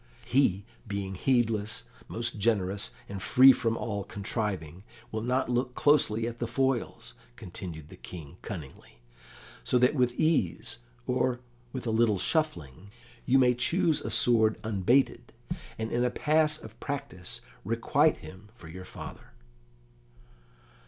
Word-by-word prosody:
"He, 105 -7 +2 0.2
being 100 -2 -3
heedless, 115 0 +1 0.2
most 115 -1 -3
generous 100 -1 +1 0.2
and 100 -1 -6
free 130 +7 +8
from 115 -1 -1
all 100 -3 -3
contriving, 95 -5 -4 0.3
will 110 - -2
not 125 +3 0
look 125 +1 -1
closely 125 -7 +3
at 120 0 -5
the 120 - -1
foils," 120 -1 -1 0.2
continued 90 -8 -8
the - - -12
King 85 -2 -10
cunningly, 75 - -9 0.6
"so 125 - +3
that 125 +2 +4
with 125 -3 +1
ease, 150 - +1 0.3
or 125 -1 +1 0.3
with 130 -1 -5
a 115 - 0
little 110 -2 +3
shuffling, 90 - -1 0.4
you 130 +1 +5
may 125 -2 +5
choose 160 +6 +1
a - - -4
sword 110 -3 +3
unbated, 120 +4 +1 0.4
and 110 0 -3
in 120 +1 +1
a 125 - +3
pass 155 +3 +2
of 110 -2 -12
practice 135 -10 -5 0.2
requite 115 +8 +2
him 95 +6 -12
for 85 - -13
your 95 +2 -9
father." - - -10
115 Hz, 135 wpm, -29 LUFS, 100-125 Hz, 0.6 s, free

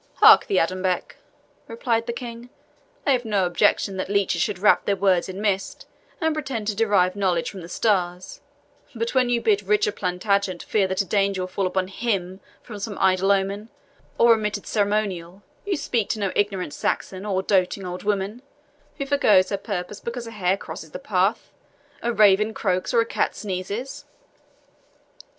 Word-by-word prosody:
"Hark - - +7
thee, 405 - +1
Adonbec," 185 -1 -1 0.5
replied 230 0 -1
the - - -1
King, 235 0 -8 0.6
"I 285 - +3
have 250 -2 +2
no 205 -4 +1
objection 190 +2 +1
that 185 - -3
leeches 200 -4 +1
should 205 0 0
wrap 210 +3 +4
their 200 - +1
words 190 -2 +2
in 190 +1 -6
mist, 200 -2 -2 0.3
and 320 -2 +1
pretend 265 -8 -4
to 210 - -2
derive 200 -4 +2
knowledge 185 -4 0
from 195 - -9
the 170 - -10
stars; 180 -3 -1 0.5
but 230 0 -2
when 255 -2 +3
you 240 -1 +2
bid 215 -3 +2
Richard 210 +1 +1
Plantagenet 185 0 -1
fear 200 -3 +1
that 190 +1 0
a - - -3
danger 195 -1 +1
will - - -4
fall 185 +1 -1
upon 185 0 -1
HIM 190 -3 -2 0.2
from 210 -4 -9
some 205 0 -5
idle 190 +1 +3
omen, 200 +2 -1 0.5
or 235 0 +6
omitted 210 -2 -2
ceremonial, 200 -3 -1 0.2
you 390 - 0
speak 235 -7 -1
to 220 - -1
no 200 -2 -1
ignorant 195 -6 -1
Saxon, 185 +5 -2
or 190 -2 -1
doting 190 0 +1
old 180 0 -5
woman, 205 +3 -2 0.6
who 275 - -3
foregoes 215 -10 +4
her 200 - 0
purpose 195 -1 -5
because 235 0 -5
a 230 - -8
hare 190 -3 0
crosses - - -9
the - - -7
path, - - 0 0.5
a 235 - 0
raven 215 0 +4
croaks, 185 -3 -1
or 235 - +4
a - - 0
cat - - -1
sneezes." 200 +6 -5
200 Hz, 175 wpm, -23 LUFS, 185-225 Hz, 0.6 s, Hark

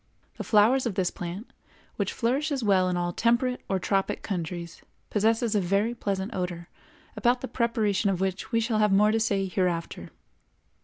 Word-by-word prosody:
The - - -4
flowers 235 +5 +4
of 210 - -3
this 185 -2 0
plant, 180 +5 -7 0.4
which - - -1
flourishes 270 +3 -1
well 190 -3 +3
in 180 - -1
all 175 0 -1
temperate 245 +4 +1
or 195 - +1
tropic 195 +1 -1
countries, 170 -3 -5 0.3
possess 220 +3 +2
a 205 - +2
very 200 +6 +1
pleasant 200 -1 -3
odor, 175 -2 -4 0.5
about 245 +1 +1
the 260 - -4
preparation 220 -5 0
of 190 -2 -1
which 190 0 -2
we 230 - +2
shall 225 -1 0
have 210 -1 +3
more 210 +2 +5
to 225 - +1
say 200 -3 +1
hereafter. 180 -3 -2
205 Hz, 170 wpm, -27 LUFS, 185-230 Hz, 0.5 s, more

